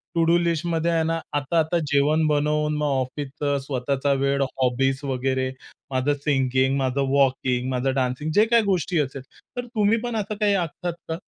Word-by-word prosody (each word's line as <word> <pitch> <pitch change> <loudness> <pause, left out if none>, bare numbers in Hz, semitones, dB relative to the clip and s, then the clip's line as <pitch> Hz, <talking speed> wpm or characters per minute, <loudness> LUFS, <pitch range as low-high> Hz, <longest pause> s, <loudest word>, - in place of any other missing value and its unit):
To 165 - +3
do 170 +1 +4
लिस्टमध्ये 170 0 0
आहे 165 -1 +2
.ना 165 +1 0 0.2
आता 145 +4 0
आता 160 +2 +1
जेवण 150 +3 +3
बनवून 150 0 +1
मग 150 - -1
ऑफिसचं 140 +1 -2
स्वतःचा 140 +1 0
वेळ 140 0 +1
हॉबीज 135 0 0
वगैरे 130 -1 -1 0.4
माझं 130 +2 +1
सिंगिंग, 130 -1 +2
माझं 135 0 0
वॉकिंग, 130 -2 +1
माझं 130 +1 0
डान्सिंग 130 +4 -1
जे 215 +2 +6
काही 230 0 +3
गोष्टी 180 -4 0
असेल 135 -2 -2 0.4
तर 245 - -2
तुम्ही 225 -2 +1
पण 240 -2 -3
असं 215 0 -2
काही 205 -1 +3
आखतात 175 -1 -2 0.2
का? 160 - -2
145 Hz, 170 wpm, -24 LUFS, 135-170 Hz, 0.4 s, जे